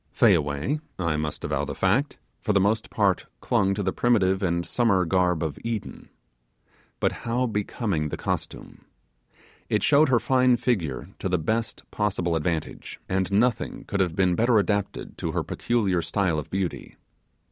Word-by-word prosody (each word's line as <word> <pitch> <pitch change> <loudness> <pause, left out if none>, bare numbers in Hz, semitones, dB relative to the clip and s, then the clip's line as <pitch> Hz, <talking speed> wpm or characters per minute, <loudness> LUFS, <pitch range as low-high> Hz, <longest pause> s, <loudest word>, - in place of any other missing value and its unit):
Fayaway 75 - +2 0.2
I 85 -4 0
must 75 -1 -3
avow - - -1
the - - -4
fact 140 +3 +1 0.2
for 105 - 0
the 100 - +4
most 105 +3 +1
part 100 -4 +1
clung 100 +7 +1
to 100 - -2
the - - 0
primitive 95 -6 +2
and 85 -2 0
summer 100 -7 +2
garb 90 -1 +1
of 75 -4 -4
Eden. 115 -3 -5 0.9
But - - +2
how 120 +2 -1
becoming 105 -7 -2
the - - -4
costume! - - -5 0.8
It - - +1
showed 150 0 +5
her 120 -2 +4
fine 130 -1 +3
figure 90 - -1
to 95 - -2
the 90 - +2
best 110 +8 -2
possible 95 -5 0
advantage; 80 0 -3
and 95 0 -1
nothing 115 +3 +1
could 100 - -3
have 90 -4 +1
been 95 -2 +3
better 115 +4 +3
adapted 100 -1 -1
to - - -3
her - - 0
peculiar 100 -7 0
style 80 0 0
of 75 - -8
beauty. 95 -2 -3
95 Hz, 160 wpm, -25 LUFS, 85-115 Hz, 0.9 s, showed